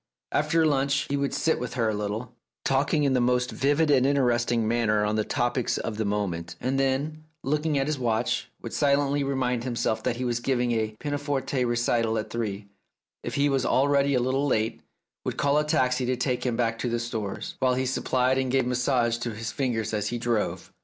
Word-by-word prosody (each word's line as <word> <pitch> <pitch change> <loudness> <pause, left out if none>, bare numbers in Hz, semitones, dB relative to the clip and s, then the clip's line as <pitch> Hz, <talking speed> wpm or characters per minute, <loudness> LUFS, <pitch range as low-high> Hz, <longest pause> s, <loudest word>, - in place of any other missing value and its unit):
After 155 +2 +2
lunch 140 -2 +1
he - - +2
would 140 0 0
sit 160 - +1
with 125 +2 -5
her 115 -3 +1
a - - 0
little, 105 +3 -4 0.3
talking 140 +3 +2
in 140 -2 +2
the 125 - +2
most 125 +1 +1
vivid 145 +3 +2
and 130 -3 +5
interesting 120 -4 +2
manner 110 -2 +2
on 105 +1 0
the 110 - +1
topics 120 +2 0
of 110 -2 -4
the 110 - -1
moment, 90 -5 -2
and 130 +2 -1
then, 145 +4 -1 0.2
looking 150 +2 0
at 135 - +1
his 150 -1 -2
watch, 115 -3 0
would - - -6
silently 140 0 +2
remind 130 -3 -1
himself 115 -3 -1
that 115 - -1
he 125 +1 -3
was 120 -1 0
giving 125 -1 0
a 110 -2 -1
pianoforte 145 -2 -1
recital 120 -1 +1
at 110 - -4
three, 105 -4 -3
and, 100 - -24 0.5
if - - -5
he 140 +1 +3
was 135 -2 +1
already 140 0 +3
a - - +3
little 135 +3 +1
late, 110 -4 0 0.4
would - - -3
call 145 +1 +3
a - - +1
taxi 130 -4 +1
to 130 - +1
take 125 0 -1
him 120 - 0
back 115 -1 0
to 125 - -1
the 120 - 0
Stores, 115 - -4
while 130 -2 +2
he 130 +1 0
suppled 130 0 +1
and 130 -1 -1
gave 135 -1 +2
massage 125 -2 +1
to 120 -2 -4
his 110 +1 -4
fingers 115 -5 -1
as 105 -1 0
he 120 - -2
drove. 115 -2 -2
125 Hz, 210 wpm, -26 LUFS, 115-140 Hz, 0.5 s, and